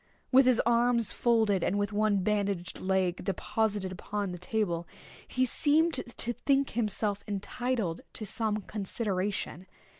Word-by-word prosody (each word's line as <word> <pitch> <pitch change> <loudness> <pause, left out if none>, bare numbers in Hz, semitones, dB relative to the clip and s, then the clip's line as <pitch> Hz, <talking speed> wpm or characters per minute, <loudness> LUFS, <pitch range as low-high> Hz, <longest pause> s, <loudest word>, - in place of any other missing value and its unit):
With 265 0 +6
his 250 -2 +4
arms 235 -1 +3
folded, 220 -6 +2
and 200 - +1
with 205 0 -1
one 205 -2 +2
bandaged 200 -3 -1
leg 185 -2 0
deposited 205 0 -1
upon 200 +1 -3
the 180 - -7
table, 180 -4 -1 0.4
he 255 0 +1
seemed 310 +6 +2 0.2
to 240 - 0
think 275 +3 +1
himself 210 -2 0
entitled 210 -2 -2
to 215 - -5
some 215 0 -1
consideration. 195 -3 -3
210 Hz, 130 wpm, -30 LUFS, 190-235 Hz, 0.4 s, With